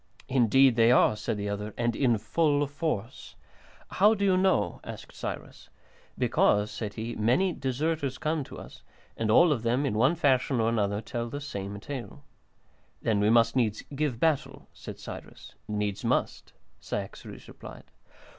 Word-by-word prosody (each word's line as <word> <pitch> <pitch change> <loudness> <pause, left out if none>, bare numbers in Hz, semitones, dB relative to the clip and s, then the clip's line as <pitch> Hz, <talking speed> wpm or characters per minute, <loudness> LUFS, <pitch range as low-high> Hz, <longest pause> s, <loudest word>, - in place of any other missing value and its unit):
"Indeed 130 0 +4
they 115 0 +5
are," 125 -3 +5
said 110 +1 -3
the 100 0 -3
other, 105 +1 -4
"and 120 -1 0
in 120 -5 +2
full 145 +6 +1
force." 140 - -4 0.5
"How 210 +3 +4
do 200 -1 -1
you 190 -2 +4
know?" 190 +1 +1
asked - - -9
Cyrus. - - -7 0.5
"Because," 105 +1 +2
said 105 -3 -5
he, 115 +1 -4
"many 130 - +2
deserters 140 +1 -2
come 155 -1 -1
to - - -11
us, - - -11 0.3
and 110 -1 -2
all 170 +9 +6
of 130 -7 0
them, 120 +5 +1
in 135 - -1
one 130 +10 +3
fashion 135 -5 +2
or 115 0 +2
another, 105 -2 0
tell 115 +1 -4
the 145 - -5
same 100 -8 -6
tale." 140 +5 -8 0.8
"Then 110 -3 +1
we 105 +1 +3
must 115 +1 +4 0.4
give 140 -5 -1
battle?" 155 -2 0
said - - -9
Cyrus. - - -10
"Needs 105 -1 -2
must," - - -1 0.3
Cyaxares - - -7
replied. - - -11
120 Hz, 155 wpm, -28 LUFS, 110-145 Hz, 0.8 s, all